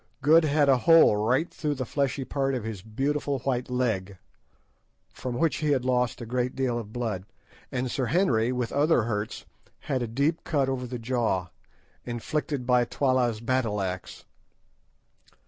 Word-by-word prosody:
Good 160 +3 +6
had 145 -1 +3
a 135 -2 +5
hole 165 -7 +6
right 125 +10 +1
through 150 -2 -2
the 130 -1 -3
fleshy 140 0 -1
part 135 -1 -1
of 125 - -3
his 110 -4 -5
"beautiful 140 +6 -1
white 125 -2 -1
leg," 110 -7 -1 1.0
from 125 -2 -5
which 165 +3 +1
he 155 -2 -1
had 130 -3 +1
lost 125 -1 0
a - - -5
great 125 +2 -2
deal 125 -3 0
of 105 -2 -8
blood; 110 -6 -3 0.5
and 125 0 -2
Sir 130 -3 -1
Henry, 125 - +2
with 125 -2 -2
other 145 -3 +3
hurts, 105 -1 -3 0.4
had 130 -2 -2
a 120 - -1
deep 140 +8 0
cut 140 -4 0
over 125 -1 -2
the 125 0 -5
jaw, 115 -6 -1 0.5
inflicted 130 +3 -3
by 125 -1 +4
Twala's 125 -3 0
battle 115 -4 0
axe. 95 -1 -5
125 Hz, 165 wpm, -27 LUFS, 115-140 Hz, 1.0 s, Good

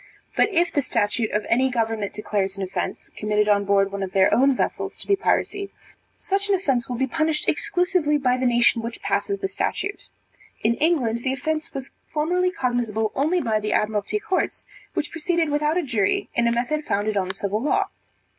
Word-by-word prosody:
But - - +4
if 350 -3 +2
the 285 - +2
statute 220 -3 0
of 210 0 -1
any 260 +3 +3
government 225 -4 -1
declares 200 -2 -2
an 195 - -3
offence, 185 - -4
committed 210 0 +1
on 200 -1 +3
board 195 0 +3
one 200 0 -4
of 190 -1 -4
their 190 -1 +4
own 270 +2 +4
vessels, - - -2
to - - -8
be 400 - +3
piracy; 400 0 0 0.5
such 400 0 -1
an 400 - +5
offence 270 -11 0
will 250 - -2
be 265 +3 +1
punished 315 +2 0
exclusively 360 -6 +2
by 255 -3 +2
the 255 0 +1
nation 240 -1 +3
which 230 +1 -6
passes 400 0 -1
the 390 - 0
statute. 395 +1 -3 0.5
In 225 +2 +3
England 275 -8 +2
the 260 +2 -1
offence 310 +3 -3
was 270 -1 -5 0.2
formerly 355 +4 +1
cognizable 240 - -1
only 320 +6 +1
by 220 -5 +1
the 210 0 -2
Admiralty 210 - 0
courts, 380 -3 -2 0.3
which 305 - -2
proceeded 330 0 0
without 300 +3 +1
a 360 - +1
jury 225 -8 0
in 235 0 +2
a - - +3
method 250 +6 -1
founded 210 -3 -1
on 190 -2 +1
the 190 - -4
civil 200 +2 -2
law. 295 - +1
250 Hz, 195 wpm, -23 LUFS, 215-315 Hz, 0.5 s, an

